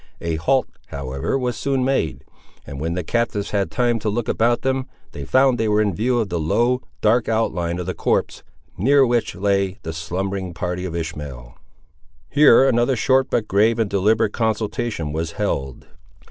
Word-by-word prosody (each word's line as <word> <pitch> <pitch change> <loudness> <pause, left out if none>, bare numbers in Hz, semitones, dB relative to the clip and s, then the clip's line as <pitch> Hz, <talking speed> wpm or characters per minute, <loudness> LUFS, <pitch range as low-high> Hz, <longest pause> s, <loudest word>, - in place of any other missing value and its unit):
A 85 -1 -2
halt, 130 +11 +1 0.2
however, 70 - -3
was 125 -3 -2
soon 135 0 -1
made; 130 - -1 0.4
and 70 - -8
when 85 +2 -2
the 90 - -2
captives 105 +1 -1
had 100 -2 0
time 120 -2 +1
to 110 - -2
look 110 +2 -2
about 120 +1 +1
them, 130 0 -1 0.2
they 70 - -7
found 130 - +3
they 110 - +1
were 105 0 +2
in 105 -2 +1
view 120 +7 0
of 110 -3 -1
the 85 - -2
low, 120 +11 +1 0.2
dark 110 +2 +2
outline 90 -6 0
of 90 - -4
the 95 - -3
copse, - - -1 0.4
near 135 +6 +5
which 120 -1 0
lay 100 0 0
the 80 - -5
slumbering 90 +2 -4
party 90 +1 -3
of 85 -2 -5
Ishmael. 75 -7 -6 0.8
Here 140 -2 +6
another 120 +1 +2
short 130 +3 +2
but 110 -3 0
grave 110 +4 +3
and 110 -3 -1
deliberative 105 +2 +2
consultation 110 -7 -2
was 80 +1 -3
held. 70 -11 -3
105 Hz, 175 wpm, -21 LUFS, 85-120 Hz, 0.8 s, Here